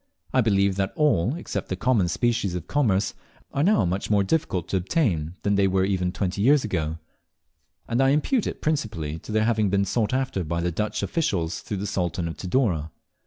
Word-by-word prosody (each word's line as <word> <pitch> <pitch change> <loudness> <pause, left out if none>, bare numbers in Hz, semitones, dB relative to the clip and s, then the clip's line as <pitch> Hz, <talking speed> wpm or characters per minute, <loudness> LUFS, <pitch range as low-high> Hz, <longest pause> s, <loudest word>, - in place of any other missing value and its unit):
I 130 - +4
believe 100 -3 +2
that 95 -1 -1
all, 130 - +2
except 105 - -5
the 95 - -1
common 105 -2 +2
species 100 0 0
of 90 -2 -4
commerce, 105 -6 +1 0.4
are 140 - 0
now 190 - +4
much 90 +3 -2
more 105 -2 +3
difficult 95 - -1
to 95 - +1
obtain 90 - 0
than 100 - +2
they 100 -1 +3
were 95 0 +2
even 90 -2 0
twenty 95 +1 -2
years 140 +5 +5
ago; 80 -6 -2 0.9
and 120 +3 +1
I 135 - +4
impute 175 - +1
it - - -6
principally 105 - -2
to - - -9
their 110 0 +2
having 110 -3 +2
been 100 +1 +2
sought 110 +2 0
after 130 -7 -1
by 85 +1 -2
the 85 +1 0
Dutch 105 +5 -2
officials 85 - -1
through 105 - -5
the 100 - -3
Sultan 90 -4 -1
of 80 - -5
Tidore. 90 - 0
100 Hz, 200 wpm, -25 LUFS, 90-120 Hz, 0.9 s, years